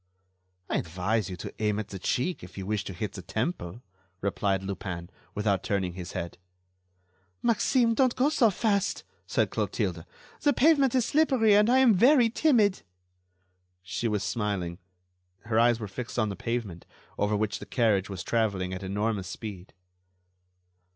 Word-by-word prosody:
"I - - 0
advise 95 +5 -1
you 90 - -6
to - - -7
aim 105 -1 +1
at 105 -1 -4
the 95 - -7
cheek 145 - -1
if 90 - -12
you 95 - -5
wish 105 0 -1
to 95 - -5
hit 100 +3 -4
the 95 - -7
temple," 110 - -4 0.4
replied 100 -1 0
Lupin, 90 -2 -5 0.2
without 100 -3 +1
turning 95 -3 -1
his 90 -1 -7
head. 85 -1 -5 1.0
"Maxime, 235 +1 +3
don't 255 +1 +2
go 265 +3 +3
so 265 -7 +4
fast," 200 -1 0 0.2
said - - +1
Clotilde, - - -2 0.4
"the 290 - +3
pavement 280 -3 +4
is 250 -3 +3
slippery 265 -9 +3
and 210 +2 +5
I 255 - +5
am 260 -4 +6
very 240 +3 +5
timid." 225 -9 +3 1.0
She 95 +5 -2
was 105 -2 -1
smiling; 100 -4 -2 0.6
her 110 0 0
eyes 120 0 +4
were 110 - -5
fixed 120 +6 -7
on 110 -3 +1
the 100 - -4
pavement, 110 -5 -4 0.3
over 105 +1 +1
which 105 0 -1
the - - -9
carriage 105 -6 +1
was 95 -2 -5
traveling 100 -5 0
at 95 - -5
enormous 100 0 -2
speed. 100 -1 -7
105 Hz, 160 wpm, -28 LUFS, -, 1.0 s, am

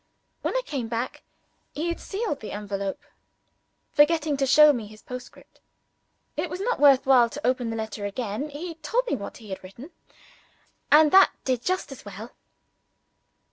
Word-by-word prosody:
When - - -2
I - - -1
came 265 -6 -3
back, 235 +2 -4 0.5
he 315 +4 -2
had 340 - -3
sealed 400 -7 -3
the 215 - -7
envelope 200 -1 -4 0.9
forgetting 305 0 +3
to 270 0 +1
show 300 +2 +7
me 230 -5 -4
his 215 +1 -15
postscript. 250 0 -11 0.8
It - - -2
was 360 - -5
not 475 +5 -1
worth 275 -2 +6
while 250 -3 +5
to - - -7
open 250 -2 0
the 225 - -3
letter 220 -1 -5
again; 220 +6 -4
he 325 +4 -6
told 470 +11 0
me 425 - 0
what 200 - -7
he 215 -3 -12
had 190 0 -6
written, 235 - -11 1.0
and 300 0 +7
that 385 0 +8
did 255 -3 0
just 370 -5 -1
as 270 - -10
well. 205 +4 -9
260 Hz, 170 wpm, -25 LUFS, 220-305 Hz, 1.0 s, that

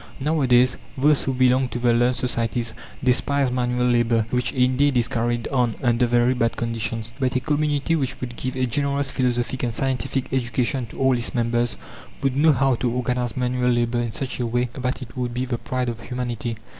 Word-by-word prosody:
Nowadays, 130 -4 +3 0.2
those 145 +2 +3
who 135 - 0
belong 130 0 +3
to - - -4
the 120 -1 +2
learned 120 +2 +3
societies 120 -2 -2 0.3
despise 130 +1 +2
manual 125 0 0
labour 120 -2 +2
which 125 0 0
indeed 130 +1 +2
is 120 -1 +2
carried 120 -2 -1
on 125 -4 +1
under 120 0 +3
very 120 +1 +3
bad 115 -2 0
conditions; 115 0 -3
but 130 -2 0
a - - +3
community 150 +2 0
which 130 -4 -2
would 120 -1 -5
give 130 +1 -4
a 130 - +2
generous 140 +2 -1
philosophic 125 0 -1
and 120 -2 -2
scientific 130 0 -2
education 125 0 0
to - - -12
all 130 -1 +3
its 120 +1 -2
members, 120 0 0 0.5
would 135 -1 +1
know 155 +3 +5
how 135 -1 +2
to 120 0 -1
organize 125 -1 -1
manual 125 0 +1
labour 120 0 +1
in 120 -1 -2
such 130 +2 -4
a 120 - 0
way 120 +1 0
that 130 0 -3
it 115 - -13
would 125 -2 -3
be 125 +1 -1
the 120 -2 -3
pride 125 +2 -2
of 120 -1 -3
humanity. 120 -2 -4
125 Hz, 195 wpm, -23 LUFS, 120-130 Hz, 0.5 s, know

